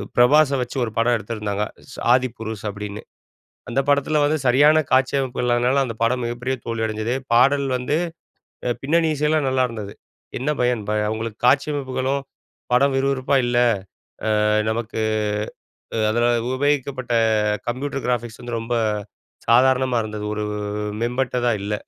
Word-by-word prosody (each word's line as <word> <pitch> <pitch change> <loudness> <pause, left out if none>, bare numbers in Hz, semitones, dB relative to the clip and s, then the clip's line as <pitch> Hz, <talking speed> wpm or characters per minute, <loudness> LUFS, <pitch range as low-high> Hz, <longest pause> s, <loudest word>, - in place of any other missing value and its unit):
பிரபாச 140 +4 +5
வச்சு 125 - -5
ஒரு 110 - -3
படம் 120 +1 +3
எடுத்திருந்தாங்க, 105 -2 -3 0.3
ச - - -10 0.2
ஆதிபுருஷ் 115 -4 -2
அப்படீன்னு. 105 +1 -6 0.7
அந்த 125 - 0
படத்துல 145 +2 +2
வந்து 155 +2 +2
சரியான 145 +5 +5
காட்சி 130 0 +3
அமைப்புகள் 125 -2 -2
இல்லாதனால, 125 +3 +2
அந்த 115 -2 -5
படம் 125 +2 +1
மிகப்பெரிய 125 +2 -2
தோல்வி 115 -1 -2
அடைஞ்சது. 110 +2 -2 0.2
பாடல் 140 +4 +4
வந்து 125 +4 -1 0.7
அ - - +1
பின்னணி 160 +3 +2
இசை 150 +1 0
எல்லாம் 155 -3 +2
நல்லாயிருந்தது. 115 -6 -1 0.5
என்ன 135 +4 -1
பயன்? 120 -3 +1
ப - - 0 0.2
உங்களுக்கு 110 -1 -5
காட்சி 140 +3 +4
அமைப்புகளும், 135 0 -2 0.5
படம் 135 +2 +3
விறுவிறுப்பா 135 0 +1
இல்ல. 120 - 0 0.9
அ - - +3 0.2
நமக்கு 110 0 -3 1.0
அ - - 0
அதுல 120 +2 +2 0.3
உபயோகிக்கப்பட்ட 135 -3 -1 0.6
கம்ப்யூட்டர் 135 +3 -3
கிராஃபிக்ஸ் 120 -2 -2
வந்து 120 -1 -3
ரொம்ப 115 +1 -3 0.7
சாதாரணமா 130 +1 +4
இருந்தது. 105 -1 -5
ஒரு 105 - -3 0.6
மேம்பட்டதா 125 0 0
இல்ல. 105 +1 -2
125 Hz, 135 wpm, -22 LUFS, 115-135 Hz, 1.0 s, பிரபாச